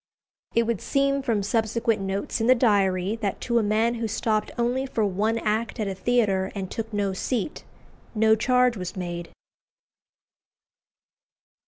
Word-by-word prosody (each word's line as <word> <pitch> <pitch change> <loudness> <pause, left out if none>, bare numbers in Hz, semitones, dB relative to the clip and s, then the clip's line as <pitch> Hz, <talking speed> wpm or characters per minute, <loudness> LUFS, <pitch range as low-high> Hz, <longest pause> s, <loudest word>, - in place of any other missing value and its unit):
It 230 - +4
would 230 -3 -2
seem 275 0 +1
from 225 -6 0
subsequent 225 0 0
notes 195 +3 -2
in 225 - +1
the 255 - +7
Diary, 200 -3 +2
that 205 -4 -2
to 235 -1 +1
a - - +2
man 220 +3 +2
who 230 -1 -2
stopped 215 0 0
only 245 +3 0
for 225 -4 0
one 210 +4 0
act 220 +2 -1
at 215 - -1
a 195 - -2
theatre, 195 -2 +1
and 190 -2 -5
took 225 0 -4
no 200 -2 -1
seat, 240 +7 -3 0.5
no 220 0 +5
charge 250 +2 +3
was 180 -3 -5
made. 175 -2 -5
220 Hz, 155 wpm, -25 LUFS, 195-235 Hz, 0.5 s, the